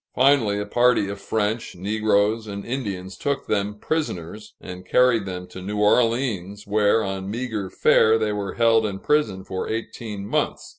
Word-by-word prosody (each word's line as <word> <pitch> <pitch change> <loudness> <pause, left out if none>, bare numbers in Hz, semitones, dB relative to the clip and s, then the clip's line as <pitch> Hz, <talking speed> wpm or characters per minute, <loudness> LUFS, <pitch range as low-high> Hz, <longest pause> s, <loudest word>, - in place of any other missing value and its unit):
Finally, 125 -6 +3
a 105 - -3
party 120 -1 +3
of 100 0 -6
French, 110 +1 -2
negroes, 105 +3 +1
and 100 -1 -6
Indians 100 -7 -4
took 140 -1 -2
them 105 0 -1
prisoners 105 - -4
and 90 0 -9
carried 120 +1 +3
them 90 -1 -5
to 95 - -10
New 105 +3 -4
Orleans, 105 -3 +1
where 105 +1 +2
on 95 0 -4
meager 110 -4 -3
fare 110 +4 +4
they 110 -1 0
were 100 -2 -4
held 115 -1 +4
in 100 -3 -2
prison 105 -7 0
for 95 -1 -4
eighteen 110 -2 -5
months. - - -2
105 Hz, 160 wpm, -23 LUFS, 100-115 Hz, -, fare